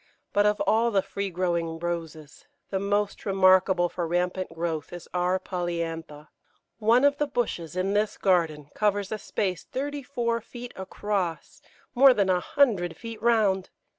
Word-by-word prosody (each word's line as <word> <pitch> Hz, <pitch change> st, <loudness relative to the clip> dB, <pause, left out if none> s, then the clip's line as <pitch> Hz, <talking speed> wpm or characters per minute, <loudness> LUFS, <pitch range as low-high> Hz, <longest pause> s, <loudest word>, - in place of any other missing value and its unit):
But 205 Hz, +1 st, +4 dB
of 210 Hz, 0 st, +1 dB
all 230 Hz, +2 st, +3 dB
the 195 Hz, -4 st, +2 dB
free 200 Hz, 0 st, -4 dB
growing 170 Hz, -2 st, -1 dB
Roses, 165 Hz, -3 st, -6 dB, 0.2 s
the 190 Hz, -, 0 dB
most 205 Hz, +1 st, -1 dB
remarkable 185 Hz, -2 st, +4 dB
for 175 Hz, -1 st, -4 dB
rampant 180 Hz, +2 st, -1 dB
growth 165 Hz, -2 st, -3 dB
is 175 Hz, -1 st, -9 dB
R. 180 Hz, +1 st, +1 dB
polyantha. 165 Hz, -4 st, -4 dB, 0.5 s
One 235 Hz, +5 st, +4 dB
of 285 Hz, 0 st, +3 dB
the 295 Hz, -, +1 dB
bushes 200 Hz, -, -3 dB
in 185 Hz, +2 st, 0 dB
this 210 Hz, +1 st, 0 dB
garden 160 Hz, -6 st, +1 dB
covers 205 Hz, -2 st, 0 dB
a 215 Hz, -, -3 dB
space 190 Hz, -3 st, -2 dB
thirty 285 Hz, +2 st, -4 dB
four 235 Hz, -3 st, -2 dB
feet 240 Hz, +2 st, -9 dB
across 190 Hz, -2 st, -3 dB, 0.3 s
more 265 Hz, 0 st, +7 dB
than 195 Hz, -2 st, +2 dB
a 180 Hz, -, +2 dB
hundred 215 Hz, -, +1 dB
feet 230 Hz, -2 st, -8 dB
round. 215 Hz, -5 st, +2 dB
190 Hz, 155 wpm, -26 LUFS, 175-215 Hz, 0.5 s, more